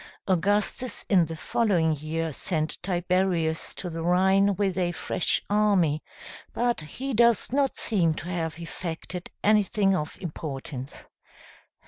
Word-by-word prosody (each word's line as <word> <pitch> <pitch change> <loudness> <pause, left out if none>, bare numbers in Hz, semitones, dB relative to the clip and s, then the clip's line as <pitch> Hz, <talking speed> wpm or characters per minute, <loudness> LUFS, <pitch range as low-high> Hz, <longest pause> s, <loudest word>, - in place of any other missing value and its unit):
Augustus 205 +6 0
in 185 -5 +5
the 165 +1 -6
following 170 -4 +1
year 155 +2 -3
sent 155 +1 -1
Tiberius 175 -2 0
to 180 - -5
the 165 -1 -5
Rhine 190 +3 +3
with 195 -1 0
a 175 -2 0
fresh 170 - -1
army; 200 -8 +2 0.5
but 240 -6 +1
he 255 - -5
does 235 0 +3
not 275 -1 +2
seem 170 -8 +2
to 155 - -6
have 165 -3 -3
effected 170 +1 -6
anything 205 -2 +3
of 150 -3 -3
importance. 140 -5 -6
180 Hz, 125 wpm, -26 LUFS, 160-205 Hz, 0.5 s, in